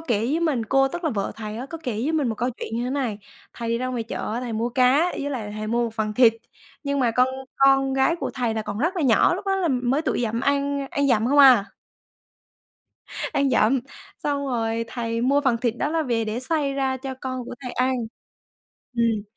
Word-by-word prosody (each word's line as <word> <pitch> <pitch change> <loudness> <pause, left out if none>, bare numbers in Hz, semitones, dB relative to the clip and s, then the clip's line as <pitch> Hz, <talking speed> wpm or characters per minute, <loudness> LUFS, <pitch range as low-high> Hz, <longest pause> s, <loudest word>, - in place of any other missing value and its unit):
kể 245 -10 0
với 265 +10 0
mình, 285 -9 0
cô, 270 +3 +3
tức 345 +5 -6
là 315 - +1
vợ 200 -3 -2
thầy 215 -1 -6
á 255 +3 -5
có 330 +3 -7
kể 250 -5 -2
với 240 +9 -1
mình 295 -6 +1
một 225 - -1
câu 245 +4 -1
chuyện 230 -2 -6
như 240 - -1
thế 250 - -2
này, 255 -7 -2 0.3
thầy 230 -1 -5
đi 230 0 0
ra 255 - -2
ngoài 250 -3 -2
chợ 220 - -5
á, 240 - -2
thầy 245 -2 -4
mua 225 +2 -1
cá 255 +7 +3
với 285 0 -4
lại 215 -6 -4
thầy 215 - -4
mua 235 +2 +1
một 225 - -5
phần 215 -1 -2
thịt, 230 -1 +6 0.5
nhưng 280 0 -1
mà 240 -3 +3
con 250 +2 +3 0.3
con 270 0 +4
gái 270 +6 +2
của - - -3
thầy 240 -4 -1
là 220 - -2
còn 210 - -5
rất 335 +8 0
là 340 - 0
nhỏ, 255 +6 +4
lúc 390 - -7
đó 390 0 +2
là 365 -3 0
mới 260 +2 +1
tuổi 300 - -1
dặm 230 0 -1
ăn 280 0 0
ăn 285 0 +1
dặm 230 -3 +3
không 285 +1 +3
à. 255 -7 +8 1.7
Ăn 275 -1 +2
dặm, 245 +2 +3 0.4
xong 285 -1 -1
rồi 230 -2 -1
thầy 230 -1 -3
mua 275 +4 +3
phần 265 -5 +2
thịt 235 -1 -1
đó 295 - 0
là 325 0 +1
về 235 -5 0
để 220 +2 -3
xay 285 +1 +1
ra 265 -1 0
cho 265 0 -6
con 255 -1 -4
của - - -7
thầy 250 -2 -5
ăn. 255 +2 +1 1.0
Ừm, 230 -3 +1
255 Hz, 240 wpm, -24 LUFS, 230-280 Hz, 1.7 s, à